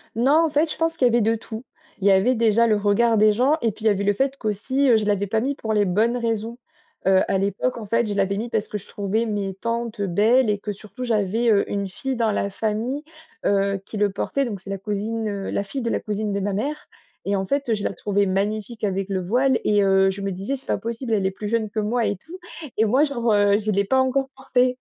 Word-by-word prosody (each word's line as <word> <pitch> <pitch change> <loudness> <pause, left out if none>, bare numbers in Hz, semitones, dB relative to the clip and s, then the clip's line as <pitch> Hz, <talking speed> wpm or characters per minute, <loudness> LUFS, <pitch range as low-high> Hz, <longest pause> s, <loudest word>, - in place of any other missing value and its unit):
Non, 280 +8 +4
en - - 0
fait, 305 +2 +1
je - - -4
pense 325 0 0
qu'il 255 - +4
y - - +3
avait 235 0 +3
de 225 +2 +2
tout. 220 +1 -8 0.4
Il 200 - +1
y - - +7
avait, 195 +7 +4
déjà, 230 0 +3
le 215 - +3
regard 210 +3 +2
des 215 0 +5
gens 250 +7 +2
et 230 - +1
puis, 215 +2 -10
il - - +5
y - - +7
avait 200 0 -1
le 205 0 +3
fait 270 +5 0
qu'aussi, 260 +6 0
heu, 230 - +6
je 215 - -1
l'avais 205 -1 0
pas 220 +3 +1
mis 270 +5 -1
pour 220 -5 -4
les 210 -1 +3
bonnes 220 +6 +1
raisons. 230 0 -2 0.5
Heu, 190 0 +5
à 195 - +2
l'époque, 200 +6 -1
en 225 - -6
fait, 230 +3 +1
je 205 - -2
l'avais 200 0 +1
mis 230 +3 -3
parce 220 -2 -1
que 210 - -4
je 200 - -13
trouvais 205 +3 -1
mes 205 -3 -2
tantes, 230 +2 -3
heu, 200 - 0
belles 220 +7 +3
et 205 -1 0
que 210 - -4
surtout 215 +5 -9
j'avais, 225 +1 +1
heu, 205 -2 +4
une 200 -1 -1
fille 265 +8 -4
dans 225 -2 +1
la 200 -1 -1
famille, 225 +8 -2 0.4
heu, 200 0 +2
qui - - -9
le 205 0 +2
portait, 275 +7 -1
donc 210 -5 -4
c'est 195 - -12
la 195 - -2
cousine, 215 +3 -3
heu, 200 -1 -4
la - - -1
fille 255 +7 -5
de 235 - -1
la - - 0
cousine 210 0 -2
de 200 - -1
ma 205 +1 -1
mère 290 +10 -3 0.4
et 200 - 0
en 195 0 -1
fait, 280 +4 -1
heu, 225 - +3
je 205 - -5
la - - -1
trouvais 200 +2 0
magnifique 210 +4 -2
avec 195 -1 -1
le 190 -1 -1
voile 250 +6 +2
et 205 -1 +3
heu, 195 0 +4
je 190 +1 -5
me 195 0 -2
disais: 195 +9 -3
«C'est 265 - -12
pas - - 0
possible, 230 +1 -4
elle 200 -3 +1
est 190 - +1
plus 210 +2 -6
jeune 220 -1 0
que 215 - -3
moi 225 +3 0
et 205 - -1
tout 330 - -11 0.4
et 220 - +4
moi 255 +7 +3
genre, 240 -6 -1
heu, 205 0 +4
je 215 0 -1
l'ai 200 0 +1
pas 260 +6 +2
encore 265 +1 +1
porté.» 255 -1 +1
215 Hz, 275 wpm, -23 LUFS, 200-235 Hz, 0.5 s, y